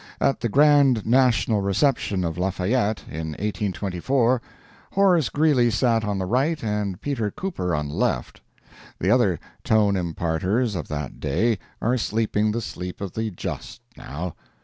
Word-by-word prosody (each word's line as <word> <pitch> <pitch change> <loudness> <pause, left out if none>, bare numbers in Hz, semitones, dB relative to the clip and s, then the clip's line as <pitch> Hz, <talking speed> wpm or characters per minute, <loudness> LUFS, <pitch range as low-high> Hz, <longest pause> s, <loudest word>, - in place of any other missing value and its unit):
At 135 - +1
the 120 - -1
grand 140 -3 +4
national 120 -3 +3
reception 100 -1 +1
of 80 -1 -2
Lafayette, 100 +4 0
in 80 0 -5
1824, 105 - 0 0.5
Horace 185 -7 +4
Greeley 145 -6 +3
sat 115 0 +2
on 105 -2 -1
the 95 - -2
right 135 - 0
and 105 -4 -2
Peter 125 -7 -1
Cooper 100 - -3
on 75 -1 -2
the - - -7
left. - - -1 0.6
The - - +1
other - - +3 0.2
Tone 105 -2 +3
imparters 90 +6 -1
of 80 -5 -4
that 75 -3 -5
day 95 +9 +1 0.2
are 125 +3 +2
sleeping 110 -1 0
the 115 +2 -2
sleep 90 -4 -6
of 100 -3 -5
the 110 0 -2
just 90 - -6
now. 80 +5 -6
105 Hz, 150 wpm, -24 LUFS, 90-125 Hz, 0.6 s, grand